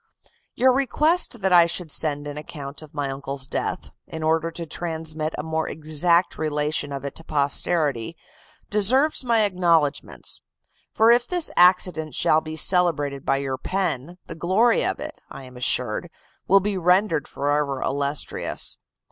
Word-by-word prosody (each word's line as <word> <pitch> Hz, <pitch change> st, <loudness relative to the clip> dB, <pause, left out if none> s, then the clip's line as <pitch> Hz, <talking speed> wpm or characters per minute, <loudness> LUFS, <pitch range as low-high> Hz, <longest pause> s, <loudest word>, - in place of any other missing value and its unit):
"Your 260 Hz, +1 st, +4 dB
request 275 Hz, -, +1 dB
that 190 Hz, -1 st, +1 dB
I 170 Hz, -1 st, +7 dB
should 170 Hz, -1 st, -4 dB
send 145 Hz, -2 st, 0 dB
an 145 Hz, 0 st, -6 dB
account 145 Hz, -1 st, -8 dB
of 155 Hz, -1 st, -14 dB
my 145 Hz, -1 st, -2 dB
uncle's 135 Hz, 0 st, -4 dB
death, 135 Hz, -, -4 dB, 0.2 s
in 160 Hz, -1 st, -7 dB
order 160 Hz, +1 st, +1 dB
to 165 Hz, 0 st, -6 dB
transmit 160 Hz, -1 st, -3 dB
a 150 Hz, -, -4 dB
more 160 Hz, 0 st, -2 dB
exact 160 Hz, +3 st, +1 dB
relation 150 Hz, -1 st, -1 dB
of 140 Hz, 0 st, -6 dB
it 140 Hz, -, -5 dB
to 165 Hz, -, -8 dB
posterity, 145 Hz, -2 st, 0 dB, 0.5 s
deserves 255 Hz, +10 st, +3 dB
my 230 Hz, -3 st, +3 dB
acknowledgments; 170 Hz, -7 st, 0 dB, 0.5 s
for 225 Hz, +1 st, +4 dB
if 240 Hz, 0 st, +3 dB
this 355 Hz, -3 st, +1 dB
accident 180 Hz, -4 st, +3 dB
shall 155 Hz, -, +3 dB
be 155 Hz, 0 st, -7 dB
celebrated 150 Hz, -6 st, +2 dB
by 135 Hz, -, +2 dB
your 135 Hz, -1 st, -3 dB
pen, 175 Hz, -4 st, -3 dB
the -, -, -8 dB
glory 195 Hz, +8 st, +2 dB
of -, -, -1 dB
it, -, -, -8 dB
I 135 Hz, -, -10 dB
am 130 Hz, -1 st, -13 dB
assured, 125 Hz, +4 st, -1 dB, 0.4 s
will 195 Hz, +1 st, +5 dB
be 200 Hz, -1 st, -2 dB
rendered 180 Hz, -3 st, +2 dB
forever 145 Hz, -1 st, -1 dB
illustrious. 140 Hz, +1 st, -2 dB
160 Hz, 155 wpm, -23 LUFS, 145-185 Hz, 0.5 s, I